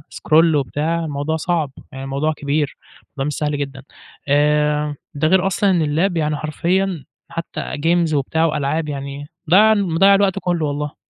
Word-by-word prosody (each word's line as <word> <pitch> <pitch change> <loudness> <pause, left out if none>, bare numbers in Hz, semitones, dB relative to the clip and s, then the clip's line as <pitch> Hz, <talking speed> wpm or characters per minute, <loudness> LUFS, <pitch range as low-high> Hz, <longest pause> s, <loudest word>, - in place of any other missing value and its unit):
scroll 160 +1 +3
وبتاع 155 +4 -1
الموضوع 145 +1 -2
صعب، 160 -4 -1 0.2
يعني 135 0 -7
الموضوع 140 +3 -1
كبير، 145 -1 -2 0.3
الموضوع 135 -2 -6
مش 150 - -2
سهل 150 -1 -1
جدًا، 140 -2 -5 0.4
آآ 150 +1 +2 0.2
ده 155 +2 +1
غير 190 +2 +3
أصلًا 195 +1 +1
إن 175 -3 +2
اللاب 165 +5 +1
يعني 150 -1 0
حرفيًا 170 +1 -1 0.2
حتى 165 0 -5 0.2
games 165 +1 +1
وبتاع 155 +3 +1
وألعاب، 150 0 -1
يعني 140 0 -6 0.2
ضيّع 215 +4 +7
مضيّع 195 0 +4
الوقت 195 -1 +2
كلّه 175 -4 -1
والله. 145 0 -3
155 Hz, 155 wpm, -19 LUFS, 145-170 Hz, 0.4 s, ضيّع